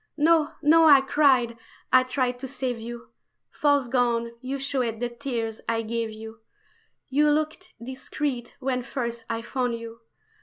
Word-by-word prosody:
"No, 320 0 +3
no!" 325 +2 +6
I 285 -3 +8
cried, 260 -5 +3 0.3
I 255 - +8
tried 255 -1 -1
to 265 - -5
save 255 -2 -3
you 235 +1 -8 0.4
False 285 -3 +2
gown, 235 -2 +1
you 265 +2 -3
showed 260 -5 -2
the 245 0 -1
tears 235 -3 -4
I 230 0 0
gave 230 0 -2
you! 220 +1 -10 0.7
You 295 +3 +3
looked 310 +5 -1
discreet 260 +1 -4
when 260 -1 -1
first 235 -2 -4
I 230 0 -2
found 245 -1 -1
you. 230 0 -9
250 Hz, 150 wpm, -26 LUFS, 235-275 Hz, 0.7 s, I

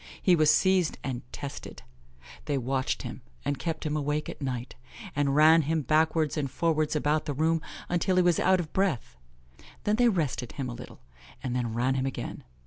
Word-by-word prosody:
He 180 - +4
was 155 -2 +4
seized 185 +1 +3
and 130 -3 -3
tested. 140 - -7 0.6
They 145 -2 0
watched 130 +2 -1
him, 125 +1 -7 0.2
and 145 -1 -1
kept 160 -2 -3
him 150 0 -1
awake 150 0 -1
at - - -8
night, 125 -2 -3 0.4
and 140 -1 +1
ran 160 +2 +7
him 155 +1 0
backwards 155 +2 +2
and 140 -3 -1
forwards 155 +1 0
about 150 +1 +1
the 145 - -2
room 160 +2 +2 0.3
until 175 +1 +1
he 180 - +5
was 175 -2 +3
out 185 0 +4
of 160 -3 -5
breath; 140 - 0 0.7
then 210 +1 +1
they 245 0 +5
rested 150 - -1
him 135 -3 -4
a - - -5
little, 120 - -11 0.4
and 125 -2 -2
then 120 -3 -2
ran 125 +3 +1
him 135 0 0
again. 135 - -5
150 Hz, 190 wpm, -28 LUFS, 135-165 Hz, 0.7 s, ran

